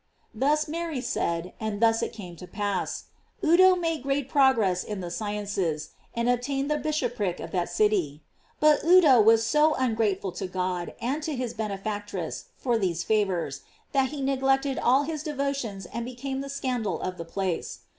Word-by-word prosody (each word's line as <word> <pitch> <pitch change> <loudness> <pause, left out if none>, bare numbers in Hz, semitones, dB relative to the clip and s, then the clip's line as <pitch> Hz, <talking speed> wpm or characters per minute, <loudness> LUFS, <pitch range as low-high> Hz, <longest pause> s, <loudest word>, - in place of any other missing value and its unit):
Thus 295 +7 +1
Mary 325 -2 -3
said, 170 -7 -2
and 215 -2 -3
thus 225 0 +4
it - - -2
came 185 -6 -9
to 180 - -10
pass. 200 -1 -2 0.4
Udo 365 +3 +7
made 330 -4 -1
great 275 0 -1
progress 230 -11 +3
in 210 -2 -5
the 175 -2 -5
sciences, 200 -6 -2 0.3
and 235 0 0
obtained 270 +4 0
the 300 - +1
bishopric 245 - -1
of - - -7
that 175 -2 -1
city. 175 -7 +1 0.4
But 305 -1 +4
Udo 320 -8 +7
was 225 +1 +5
so 300 +4 +3
ungrateful 220 -6 0
to 185 +2 -5
God 180 -1 -3
and 265 +6 -1
to 310 -1 -3
his 245 -2 -3
benefactress 205 -4 -4
for 240 -3 0
these 175 -4 -1
favors, 185 -10 0 0.3
that 270 -2 +2
he 290 -1 -5
neglect 270 0 +2
ed 275 -1 -1
all 265 +4 +4
his 310 0 -4
devotions 275 - -3
arid 235 0 -3
became 265 +2 -4
the 275 - -6
scandal 255 -6 -2
of 185 -1 -4
the - - -3
place. 185 0 -3
230 Hz, 170 wpm, -27 LUFS, 195-275 Hz, 0.4 s, Udo